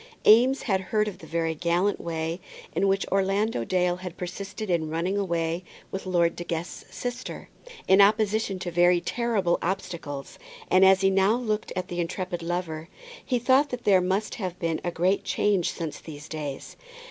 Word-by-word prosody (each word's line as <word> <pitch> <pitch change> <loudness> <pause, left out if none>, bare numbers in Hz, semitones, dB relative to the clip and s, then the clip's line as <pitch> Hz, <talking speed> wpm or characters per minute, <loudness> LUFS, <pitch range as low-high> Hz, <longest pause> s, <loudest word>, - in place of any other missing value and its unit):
Eames 250 +5 +6
had 195 -5 +1
heard 210 +3 0
of 205 - -6
the 160 - -12
very 165 0 -1
gallant 175 +5 0
way 165 +1 -3 0.4
in 195 - +2
which 195 0 +1
Orlando 195 - +1
Dale 180 +5 +1
had 180 -1 -8
persisted 195 +4 -5
in 170 -4 0
running 170 +5 -1
away 170 -3 -1 0.3
with 190 0 -5
Lord 170 -2 +2
De 175 - -5
Guest's 170 +1 -5
sister, 245 +1 -6 0.4
in 190 +1 +7
opposition 210 -1 +3
to 180 -1 -5
very 175 +1 +4
terrible 210 -4 0
obstacles, 170 -6 -4 0.3
and 185 - +6
as 190 0 +6
he 195 0 +4
now 195 +3 +3
looked 220 -3 -2
at 185 - -3
the 175 - -4
intrepid 180 +1 -3
lover, 165 -2 -3 0.3
he 250 - 0
thought 260 +4 +3
that 250 -2 -5
there 190 -3 +5
must 190 +4 -1
have 180 -2 -3
been 165 -2 -2
a 175 - 0
great 180 +3 +1
change 200 -4 +1
since 160 -3 -5
those 150 -1 -10
days. 150 -4 -6
185 Hz, 175 wpm, -26 LUFS, 170-200 Hz, 0.4 s, in